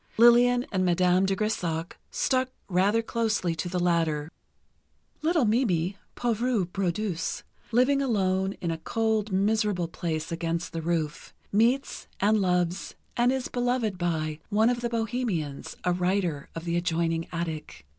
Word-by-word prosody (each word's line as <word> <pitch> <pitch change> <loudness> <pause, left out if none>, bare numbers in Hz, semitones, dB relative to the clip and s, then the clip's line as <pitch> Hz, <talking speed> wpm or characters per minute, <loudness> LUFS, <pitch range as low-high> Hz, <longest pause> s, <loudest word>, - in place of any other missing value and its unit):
Lillian 245 +2 +6
and 190 -3 +1
Madame 180 +1 +3
de 195 - +1
Grésac 175 -6 -1 0.2
stuck 260 -1 +1 0.2
rather 200 +5 +2
closely 220 -7 0
to 165 +2 -3
the 180 - -2
latter. 165 -3 +1 0.9
Little 320 -3 +2
Mimi, 200 -6 +1 0.2
pauvre 235 -3 +1
brodeuse, 180 -1 -2 0.3
living 255 +4 +3
alone 190 -6 +1
in 170 - -1
a 165 - -4
cold, 220 +2 0
miserable 200 -2 +1
place 160 -1 -3
against 165 0 -2
the 165 - -3
roof, 160 -2 -2 0.2
meets 235 +6 +1
and 210 +1 +3
loves, 180 -1 0 0.2
and 240 +1 +3
is 260 -1 -1
beloved 245 -5 -1
by, 155 -3 -1
one 220 +3 +4
of 240 -1 -2
the 240 - -1
bohemians, 225 - -2
a 180 - +2
writer, 180 -5 0
of 165 +1 -6
the 170 0 -1
adjoining 165 -1 0
attic. 165 - -5
190 Hz, 140 wpm, -27 LUFS, 170-230 Hz, 0.9 s, Lillian